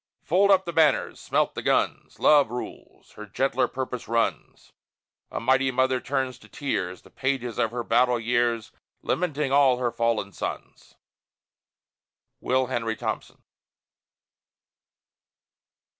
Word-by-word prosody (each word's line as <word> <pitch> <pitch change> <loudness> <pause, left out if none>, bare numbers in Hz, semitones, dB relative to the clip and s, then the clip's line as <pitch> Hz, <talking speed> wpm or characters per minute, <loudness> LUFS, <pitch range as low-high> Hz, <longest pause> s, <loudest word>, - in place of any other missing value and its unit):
Fold 190 +5 +3
up 190 -1 +5
the 170 - -5
banners! 155 -4 +2
Smelt - - 0
the - - -5
guns! - - 0
Love 145 -5 +5
rules. 125 +1 -8
Her 105 0 -10
gentler 130 +4 0
purpose 125 -2 -5
runs. 115 0 -2 0.6
A - - -4
mighty 130 +2 +2
mother 130 0 +1
turns 130 -1 -3
in - - -17
tears, 95 -11 -3
The - - -18
pages 130 -3 -2
of 115 - +2
her 120 +1 -4
battle 120 +1 +2
years, 120 -1 0 0.3
Lamenting 150 -5 -1
all 135 -3 +5
her 125 -1 -1
fallen 115 -4 -1
sons! - - -7 1.4
WILL 130 0 +1
HENRY 115 -3 -2
THOMPSON. - - -5
125 Hz, 125 wpm, -25 LUFS, 115-135 Hz, 1.4 s, up